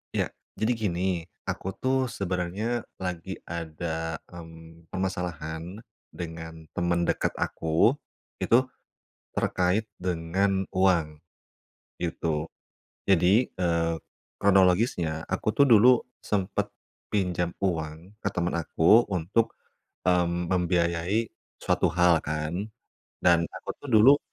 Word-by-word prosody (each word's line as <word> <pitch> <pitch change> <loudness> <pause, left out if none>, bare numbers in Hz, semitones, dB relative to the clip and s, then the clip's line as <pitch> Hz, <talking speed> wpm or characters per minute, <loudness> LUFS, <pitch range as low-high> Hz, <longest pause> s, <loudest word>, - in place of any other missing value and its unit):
Iya, - - 0 0.2
jadi 110 +3 +1
gini, 90 -5 -1 0.5
aku - - -4
tuh 130 0 +1
sebenarnya 100 +4 -2
lagi 90 0 -4
ada, 80 0 -4 0.2
mmm, 80 -1 -12
permasalahan 90 0 -4 0.2
dengan 80 -1 -8
temen 85 0 0
dekat - - 0
aku, 80 +7 +2 0.5
itu 120 +3 +4 0.7
terkait 95 +5 +1
dengan 95 +2 0
uang, 85 -5 +2 0.8
gitu. 80 -2 -2 0.6
Jadi, 95 +7 +4
eee, 85 -2 +1 0.4
kronologisnya 90 -4 +3
aku 95 +3 -1
tuh 140 +6 +4
dulu 115 -1 +7 0.3
sempat 95 -3 -1 0.4
pinjam 90 -4 0
uang 85 0 -3
ke - - +1
teman 90 0 0
aku 85 +9 +5
untuk, 95 +6 0 0.5
mmm, 90 -1 +2
membiayai 90 +3 +1 0.3
suatu - - +1
hal 85 -2 +4
kan. 75 +1 -3 0.7
Dan 85 -1 +4
aku - - -6
tuh 145 - -10
dulu 130 +7 +8
90 Hz, 100 wpm, -27 LUFS, 80-95 Hz, 0.8 s, dulu